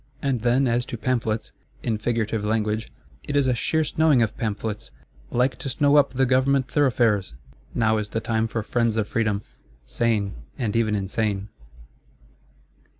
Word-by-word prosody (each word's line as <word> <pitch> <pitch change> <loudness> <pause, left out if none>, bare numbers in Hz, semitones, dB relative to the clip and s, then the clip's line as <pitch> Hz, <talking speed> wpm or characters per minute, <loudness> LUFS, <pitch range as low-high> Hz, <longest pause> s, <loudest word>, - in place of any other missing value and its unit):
And 135 -5 -1
then 125 +3 +3
as 120 +1 +1
to 120 - -5
Pamphlets—in 110 -2 -3
figurative 110 -1 -1
language; 110 0 -1 0.3
"it 145 - -4
is 140 -1 +4
a 130 - +2
sheer 160 +7 +1
snowing 155 -5 +3
of 110 - -2
pamphlets; 110 -1 -3 0.4
like 125 +2 +1
to 135 - -4
snow 145 +2 +3
up 145 -2 +4
the 135 +1 +3
Government 130 +1 +2
thoroughfares!" 120 - +2 0.4
Now 110 -2 +2
is 105 -1 -4
the 110 - -2
time 110 0 0
for 115 0 -3
Friends 115 0 0
of 105 -2 0
Freedom; 105 -3 0 0.4
sane, 105 - 0 0.2
and 110 -4 -2
even 110 -2 +2
insane. 100 0 -1
115 Hz, 150 wpm, -24 LUFS, 110-130 Hz, 0.4 s, is